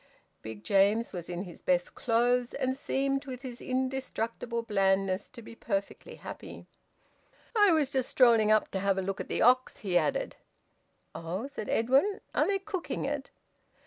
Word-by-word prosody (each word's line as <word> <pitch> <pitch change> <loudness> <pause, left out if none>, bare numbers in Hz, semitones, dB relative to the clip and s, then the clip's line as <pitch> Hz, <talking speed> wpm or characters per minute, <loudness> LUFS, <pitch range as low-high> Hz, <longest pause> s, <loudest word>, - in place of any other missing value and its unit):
Big 110 -1 -8
James 205 +4 +3
was 175 -2 -6
in 175 +1 -3
his 175 -4 -11
best 180 -1 +1
clothes, 245 +1 +1
and 260 -1 -1
seemed, 275 0 -1
with 255 0 -7
his 245 -2 -7
indestructible 255 -3 -2
blandness, 195 -2 +1
to 235 -3 -12
be - - -11
perfectly 200 -3 -4
happy. - - -9 0.9
"I 415 -2 +6
was 300 -4 +2
just 260 -2 0
strolling 230 -4 +5
up 215 0 +3
to 190 - -2
have 195 0 +1
a 190 - 0
look 195 0 -3
at - - -7
the - - 0
ox," 255 +2 +3
he 180 -2 +3
added. - - -2 0.8
"Oh!" 175 +8 -4
said 265 -6 -6
Edwin. 270 - +2
"Are - - +2
they 400 0 +2
cooking 380 -2 -4
it?" - - -3
235 Hz, 165 wpm, -29 LUFS, 195-265 Hz, 0.9 s, I